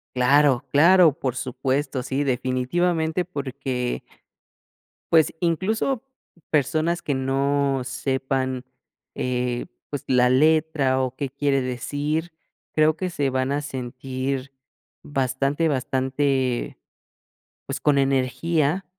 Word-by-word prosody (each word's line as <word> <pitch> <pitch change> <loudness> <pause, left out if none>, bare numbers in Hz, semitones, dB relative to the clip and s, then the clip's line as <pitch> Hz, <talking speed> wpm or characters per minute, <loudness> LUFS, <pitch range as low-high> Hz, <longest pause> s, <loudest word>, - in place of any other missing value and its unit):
Claro, 135 +1 +4
claro, 170 +2 +6
por 130 -3 -3
supuesto, 130 +2 -2
sí, 135 +3 -1
definitivamente, 160 +7 0
porque 135 -6 -3 1.1
pues, 160 -2 +5
incluso 215 - 0 0.5
personas 155 +4 +1
que 145 - -1
no 135 +1 +1
sepan, 130 0 -2 0.5
eh, 125 -1 -2 0.2
pues, 145 - -4
la 125 -1 +4
letra 145 -1 +3
o 130 -1 -2
qué 140 -1 -3
quiere 140 0 0
decir, 145 +6 -2 0.4
creo 155 0 +3
que 185 -1 -2
se 145 -5 -1
van 130 +1 0
a 145 - 0
sentir 130 0 -4 0.5
bastante 135 +3 0
bastante, 130 -1 0 0.9
pues, - - -4
con 145 -2 +3
energía, 140 +6 +1
135 Hz, 100 wpm, -24 LUFS, 130-155 Hz, 1.1 s, claro